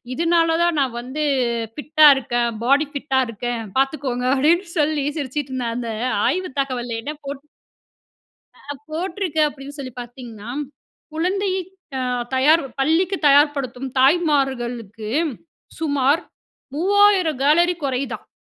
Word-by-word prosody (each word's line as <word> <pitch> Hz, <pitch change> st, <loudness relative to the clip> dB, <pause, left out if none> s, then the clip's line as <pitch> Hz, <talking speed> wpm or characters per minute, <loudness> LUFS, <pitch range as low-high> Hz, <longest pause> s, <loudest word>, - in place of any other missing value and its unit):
இதுனால, 330 Hz, +3 st, +2 dB
தான் 345 Hz, -2 st, +2 dB
நான் 255 Hz, -4 st, -1 dB
வந்து 260 Hz, +5 st, -5 dB, 0.5 s
ஃபிட்டா 305 Hz, +1 st, +4 dB
இருக்கேன், 240 Hz, -2 st, 0 dB, 0.2 s
பாடி 280 Hz, +4 st, +4 dB
ஃபிட்டா 280 Hz, -2 st, -1 dB
இருக்கேன் 230 Hz, +1 st, -4 dB, 0.2 s
பாத்துக்கோங்க 270 Hz, -2 st, -1 dB
அப்டின்னு 330 Hz, +8 st, +3 dB
சொல்லி 300 Hz, -1 st, +1 dB
சிரிச்சுட்ருந்தேன். 260 Hz, -4 st, -3 dB
அந்த 240 Hz, -1 st, -4 dB, 0.4 s
ஆய்வு 370 Hz, +1 st, -1 dB
தகவல்ல 245 Hz, -4 st, -3 dB
என்ன 295 Hz, +5 st, -5 dB
போட்டு 280 Hz, +1 st, -7 dB, 1.1 s
ஆ -, -, -21 dB
அ -, -, -3 dB, 0.2 s
போட்ருக்கு 340 Hz, 0 st, -2 dB
அப்டின்னு 285 Hz, 0 st, -9 dB
சொல்லி 255 Hz, -3 st, -6 dB
பாத்தீர்கன்னா? 240 Hz, -3 st, -10 dB, 0.6 s
"குழந்தையை 375 Hz, +3 st, 0 dB, 0.4 s
ஆ -, -, -1 dB, 0.3 s
தயார் 300 Hz, +6 st, +5 dB, 0.2 s
பள்ளிக்கு 335 Hz, +7 st, +2 dB
தயார்படுத்தும் 275 Hz, -3 st, +2 dB
தாய்மார்களுக்கு 260 Hz, -, +1 dB, 0.7 s
சுமார் 285 Hz, 0 st, +2 dB, 0.5 s
3000 380 Hz, -3 st, +3 dB
கலோரி 345 Hz, +5 st, +4 dB
கொறையுதான்". 270 Hz, 0 st, -3 dB
280 Hz, 110 wpm, -21 LUFS, 255-320 Hz, 1.1 s, தயார்